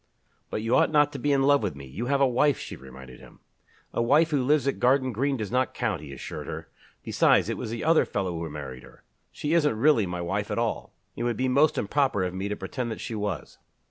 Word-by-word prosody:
"But 110 - -3
you 115 +3 +2
ought - - +4
not 150 -1 +3
to 140 - -5
be 145 +3 0
in 135 -1 +3
love 145 -1 +4
with 100 -8 -2
me 70 -1 -9
you 95 - -5
have 140 0 +1
a 135 - +6
wife," 130 +3 +2
she - - -7
reminded 65 -1 -12
him. - - -16 0.5
"A - - 0
wife 150 +7 +4
who 140 -4 +1
lives 140 0 +2
at 140 - -1
Garden 130 +1 +3
Green 135 +5 0
does 110 -3 -4
not 130 +1 0
count," 100 -8 -1
he 75 -2 -9
assured 70 - -7
her. - - -6 0.3
"Besides, - - +3
it - - -2
was - - -5
the 115 +1 -4
other 165 +1 +4
fellow 95 -3 -2
who 85 -1 -4
married 70 -4 -7
her. - - -17 0.3
She 150 +2 -2
isn't 150 -9 +3
really 115 -5 +4
my 90 0 -4
wife 100 +4 -2
at - - -2
all. 115 -1 -2 0.2
It - - -6
would 120 -2 -1
be 130 - 0
most 140 +4 +3
improper 130 -2 +1
of 90 -1 -2
me 95 +2 -3
to 105 - -2
pretend 120 +6 -4
that 110 - -5
she - - -5
was." 105 -6 -4
120 Hz, 250 wpm, -26 LUFS, 95-140 Hz, 0.5 s, a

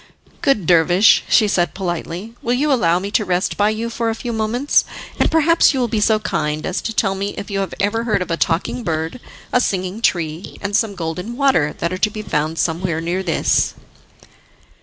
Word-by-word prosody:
"Good 215 -10 +2
dervish," 175 +5 +5
she 215 - +5
said 175 -6 0
politely, 180 +3 -4
"will 240 +1 0
you 290 +3 +2
allow 175 -9 +2
me 200 +2 -4
to 215 - +2
rest 180 -1 -1
by 205 +1 +2
you 220 +2 -2
for 230 0 -1
a 225 - -1
few 235 +1 -5
moments, 225 +6 +1 0.4
and - - +3
perhaps 320 -2 +4
you - - 0
will 245 - +1
be 225 -2 -1
so 215 +1 +4
kind 155 -7 -2
as 185 - -2
to 225 - -3
tell 205 -3 +1
me 200 +1 -4
if 200 - -6
you 195 - -1
have 195 - -3
ever 205 +3 0
heard 205 -5 +1
of 180 - -8
a - - +2
Talking 170 +9 -1
Bird, 160 +3 -3 0.3
a 250 - +4
Singing 190 0 -2
Tree, 165 -4 -1
and 205 0 -3
some 215 -2 +1
Golden 180 +7 -5
Water 265 - +2
that 170 +2 -2
are 185 - -4
to 215 - +2
be 215 0 -7
found 155 -3 -1
somewhere 165 0 -1
near 175 +3 -2
this?" 170 -4 +1
200 Hz, 210 wpm, -19 LUFS, 170-225 Hz, 0.4 s, dervish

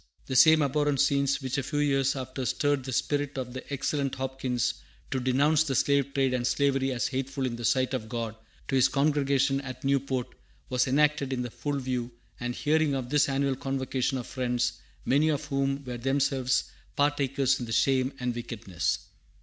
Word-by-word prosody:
The 130 - -4
same 160 +3 +7
abhorrent 145 0 +1
scenes 140 0 +2
which 130 +2 -1
a - - 0
few 145 +3 -4
years 135 -2 +2
after 130 0 -5
stirred 145 -3 0
the 130 - -4
spirit 145 +3 -1
of 125 -2 -4
the 130 +2 -8
excellent 140 0 -1
Hopkins 130 -2 -1 0.4
to 130 - 0
denounce 140 +5 +3
the 140 -4 -2
slave 140 +1 +2
trade 135 -2 +2
and 120 -1 0
slavery 135 -1 +1
as 125 -1 -1
hateful 135 +1 -2
in 120 -2 -2
the 120 - -7
sight 130 +2 +2
of 110 -4 -3
God 115 -3 -3 0.3
to - - -1
his 130 - +5
congregation 140 -1 +2
at 130 -2 -8
Newport 135 -2 0 0.4
were 125 - -1
enacted 145 0 +2
in 125 -1 -1
the 120 - -6
full 140 +5 -3
view 125 -2 -2 0.3
and 120 0 -3
hearing 155 -1 +2
of 130 -2 -4
the 150 0 +4
annual 135 0 +1
convocation 135 0 -1
of 125 - -5
Friends, 125 -2 -1 0.3
many 145 +4 +3
of 150 -1 -1
whom 140 -1 -1
were 125 -1 -5
themselves 135 0 +1 0.3
partakers 140 -2 +1
in 120 - -5
the - - -6
shame 130 +2 +2
and 125 -1 -1
wickedness. 115 -6 -2
135 Hz, 185 wpm, -28 LUFS, 125-140 Hz, 0.4 s, same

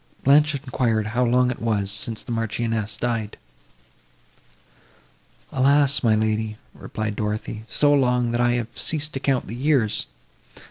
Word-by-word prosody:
Blanche 150 +2 +4
enquired 125 -5 -1
how 125 +2 +2
long 125 +1 +2
it - - -6
was, 105 -4 0
since 105 +2 -4
the - - -8
Marchioness 115 -1 -2
died? 115 -3 -3 2.1
"Alas! 140 +2 +4
my 110 -3 +3
lady," 110 0 -1 0.2
replied 110 -1 -5
Dorothée, 105 +1 -4
"so 145 -1 +3
long—that 125 -3 +1
I 120 0 +3
have 120 -1 -3
ceased 155 -1 -1
to 135 - -3
count 135 -2 0
the 115 - -7
years! 125 -5 +1
120 Hz, 135 wpm, -23 LUFS, 110-135 Hz, 2.1 s, Blanche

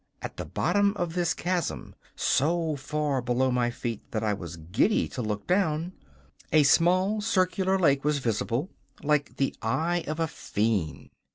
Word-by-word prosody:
At - - -6
the - - -4
bottom 200 0 +1
of 175 -2 -2
this 175 -1 0
chasm, 180 0 -2 0.2
so 160 +2 +1
far 140 0 -1
below 125 +2 +1
my 125 -1 +1
feet 120 -2 -4
that 110 -1 -2
I 105 -1 +1
was 85 -4 -7
giddy 90 - +1
to 130 - -5
look 105 -2 -3
down, 175 -2 +1 0.6
a 155 -1 +6
small 185 +7 +3
circular 190 -2 +1
lake 140 -7 +3
was 150 0 +2
visible, 120 - -1 0.3
like 150 -1 +1
the 135 - 0
eye 165 +10 0
of 155 +2 -3
a 165 - +2
fiend. 105 - -2
150 Hz, 160 wpm, -27 LUFS, 120-175 Hz, 0.6 s, a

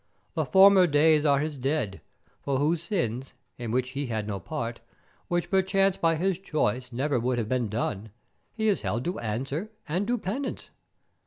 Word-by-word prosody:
The - - 0
former 190 -1 +7
days 150 0 +4
are 140 -2 +4
his 150 0 -2
dead, 130 -7 -1 0.4
for 140 -1 -1
whose 155 +4 +1
sins, 135 - -2 0.3
in 120 -2 -4
which 125 +2 0
he 140 +1 -4
had 110 -3 -3
no 100 -2 -3
part, 120 -4 -4 0.5
which 175 -1 -1
perchance 195 0 +3
by 165 -2 +2
his 185 +2 0
choice 130 - -1
never 130 +2 0
would 125 +1 0
have 115 -3 -1
been 125 -4 0
done, 105 -1 -3 0.4
he 220 -1 -1
is 205 - +2
held 120 +3 -2
to 175 - -2
answer 135 - -3 0.2
and 180 +6 -1
do 245 +1 +1
penance. 240 +7 -4
145 Hz, 175 wpm, -27 LUFS, 120-180 Hz, 0.5 s, former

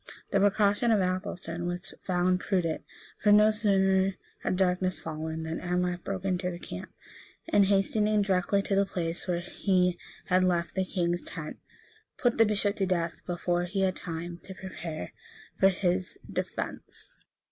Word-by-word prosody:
The 200 - +3
precaution 205 +3 +3
of 220 -2 +5
Athelstan 185 -2 -2
was 175 +1 -5
found 180 0 +1
prudent; 180 -5 0 0.4
for 210 - +4
no 210 +1 +7
sooner 195 -2 +3 0.2
had - - -1
darkness 185 0 +1
fallen, 160 0 -4
than 160 +1 -3
Anlaf 180 0 -1
broke 195 -1 -4
into 180 -1 0
the 175 - -5
camp, 90 - -7 0.6
and 200 -1 +5
hastening 210 +2 +3
directly 195 +1 +2
to 200 - -1
the 195 0 +3
place 170 -2 -3
where 175 -1 0
he 180 -1 +1 0.3
had 185 0 +3
left 175 -2 +1
the 190 -1 0
king's 175 -2 0
tent, 155 -3 -6 0.6
put 245 -2 +1
the 225 - +7
bishop 205 0 +1
to 195 - +1
death, 170 -2 -1
before 175 0 0
he 195 +2 -2
had 190 -1 +2
time 170 +1 -5
to 190 - -9
prepare 165 - -6 0.5
for 195 - +7
his 185 0 -1
defence. - - -4
185 Hz, 160 wpm, -29 LUFS, 175-195 Hz, 0.6 s, no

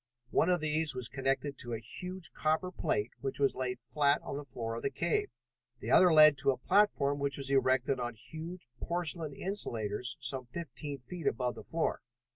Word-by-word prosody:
One 170 - +3
of 180 -2 +2
these 155 -1 +1
was 125 -2 -3
connected 135 +1 -1
to 120 -1 -4
a - - -2
huge 180 +10 -7
copper 160 +4 0
plate 105 - -1
which 135 0 -2
was 140 -1 +3
laid 125 -1 -3
flat 140 +4 +2
on - - -5
the 145 - -4
floor 115 -4 -5
of 115 - -4
the - - 0
cave. 415 - 0 0.5
The - - -4
other 180 -1 +7
led 155 -2 +8
to - - +3
a 130 - +2
platform 145 -3 +3
which 140 0 0
was 135 -1 -2
erected 130 -1 +3
on 120 -1 -3
huge 165 - -8
porcelain 165 -3 -1
insulators 120 - -2
some 130 -1 -2
fifteen 145 0 -6
feet 145 +6 -6
above 125 0 0
the - - -10
floor. 160 +10 -1
140 Hz, 190 wpm, -32 LUFS, 125-160 Hz, 0.5 s, led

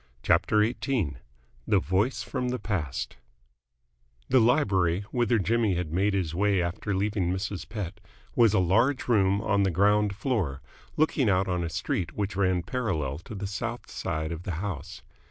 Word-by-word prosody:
CHAPTER 105 0 +3
XVIII 115 - -1 0.5
THE 105 - +4
VOICE 95 +9 0
PROM 125 -2 -2
THE 125 - -1
PAST 95 - -3 1.1
The 130 - +5
library, 100 - +3
whither 120 -2 +2
Jimmy 110 0 +1
had 85 -3 -3
made 100 +3 +2
his 85 -5 -1
way 100 +2 +2
after 90 +3 -2
leaving 100 -2 0
Mrs. 95 +1 -4
Pett, 100 -3 -5 0.4
was 115 -4 +5
a - - +4
large 115 +10 +2
room 100 -4 +3
on 100 -2 +1
the 95 - +3
ground 100 +3 +3
floor, 100 - -1 0.4
looking 145 -6 +2
out 95 0 +2
on 90 -1 0
the 85 - -2
street 85 0 -2
which 100 -1 -3
ran 95 -3 +1
parallel 85 - -2
to 105 - -9
the 100 0 -4
south 115 +5 -4
side 80 +1 -3
of 85 0 -5
the 90 - -4
house. 95 -4 -5
100 Hz, 165 wpm, -27 LUFS, 90-110 Hz, 1.1 s, The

